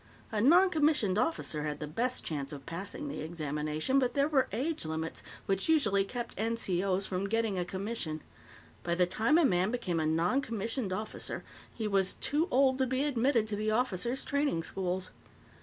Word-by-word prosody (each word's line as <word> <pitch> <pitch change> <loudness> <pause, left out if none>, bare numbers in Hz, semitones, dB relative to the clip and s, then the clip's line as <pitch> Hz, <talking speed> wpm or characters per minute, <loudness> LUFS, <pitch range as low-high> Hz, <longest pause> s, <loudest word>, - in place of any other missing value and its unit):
A 215 -2 0
noncommissioned 300 - +4
officer 250 - 0
had 150 -1 -3
the 150 - -3
best 235 - -2
chance 140 -3 -4
of 140 -2 -8
passing 195 - -5
the 280 - -5
examination, 155 - -1
but 250 -2 0
there 280 0 +3
were 285 -4 +2
age 280 +10 -2
limits 160 +1 -4 0.2
which 195 +7 -1
usually 210 -11 +4
kept 240 +4 -5
NCO's 195 -3 0
from 190 +2 -2
getting 225 -3 0
a 175 - -1
commission. 190 -5 -4 0.6
By 170 0 -1
the 180 +1 +4
time 220 - +2
a 340 - +5
man 185 -4 +2
became 185 -8 -1
a 155 - +1
noncommissioned 225 - 0
officer, 215 +3 -3 0.3
he 220 -2 -3
was 195 -2 +2
too 305 +4 0
old 265 -1 +3
to 260 - +2
be 260 +2 0
admitted 255 -4 +2
to 210 - -1
the 215 +1 -1
officers 240 +2 0
training 285 - 0
schools. 185 +1 -3
210 Hz, 175 wpm, -31 LUFS, 175-260 Hz, 0.6 s, a